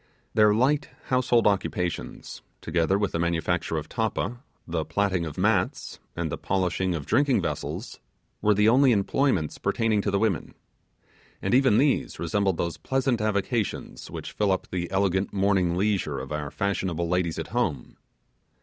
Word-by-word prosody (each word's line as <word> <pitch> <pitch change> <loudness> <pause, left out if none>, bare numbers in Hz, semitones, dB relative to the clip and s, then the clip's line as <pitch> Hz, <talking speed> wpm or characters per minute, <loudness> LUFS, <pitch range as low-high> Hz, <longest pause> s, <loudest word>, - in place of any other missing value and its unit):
Their 105 -1 +5
light 140 +6 +2 0.2
household 125 -2 +3
occupations, 90 -3 -2 0.2
together 85 +3 +1
with 100 -1 0
the 85 - -2
manufacture 85 0 0
of 75 0 -4
tappa, 115 +3 -2 0.3
the 85 -2 -1
platting 95 -2 0
of 75 - -8
mats, - - 0 0.2
and 85 -3 -2
the - - -4
polishing 95 -1 0
of 75 -4 -5
drinking 140 - +2
vessels, - - -4 0.4
were 105 -1 +3
the 105 +2 +4
only 130 +2 +5
employments 100 - +1
pertaining 110 -2 +1
to 100 - -1
the 100 - +1
women. 105 -4 -1 0.8
And - - -1
even 130 -4 +5
these 140 0 +1
resembled 95 +2 0
those 85 -1 -2
pleasant 130 -3 0
avocations 105 +1 -2
which - - -7
fill 105 -2 +1
up 95 - -1
the 85 -2 -2
elegant 95 0 0
morning 95 -3 +2
leisure 95 -7 0
of 65 +1 -6
our 75 -1 -3
fashionable 95 -2 -1
ladies 90 -1 0
at 80 - -5
home. 90 - -2
100 Hz, 155 wpm, -26 LUFS, 85-110 Hz, 0.8 s, Their